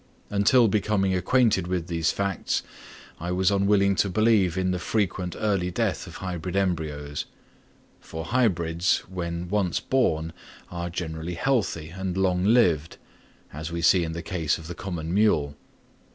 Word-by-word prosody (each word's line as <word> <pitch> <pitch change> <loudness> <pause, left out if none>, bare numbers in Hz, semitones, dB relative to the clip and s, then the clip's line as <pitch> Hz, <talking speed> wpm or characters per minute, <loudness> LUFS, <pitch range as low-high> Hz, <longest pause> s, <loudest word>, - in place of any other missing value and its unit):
Until 105 +4 +4
becoming 100 -2 +1
acquainted 95 0 +2
with 90 -2 -1
these 85 -2 0
facts, 100 -1 -1 0.6
I 85 +2 -3
was 95 +1 +2
unwilling 100 0 +3
to 100 - +2
believe 100 -3 +3
in 95 0 +1
the 90 - -1
frequent 95 -3 -1
early 100 -4 0
death 85 - -1
of - - -10
hybrid 90 -1 -5
embryos; 80 -6 -2 0.7
for 80 0 -7
hybrids, 90 -6 +1
when 85 -1 -4
once 95 -2 0
born, 80 -11 0 0.4
are 85 0 -4
generally 85 0 -4
healthy 100 - 0
and 95 +1 -4
long 90 -1 +1
lived, 90 -9 +3 0.6
as 80 +3 -6
we 85 0 -3
see 90 0 +5
in 80 -1 -3
the 85 +1 -5
case 80 -4 -1
of 80 - -11
the 85 - -5
common 85 -2 -5
mule. 75 -9 +2
90 Hz, 150 wpm, -25 LUFS, 85-100 Hz, 0.7 s, see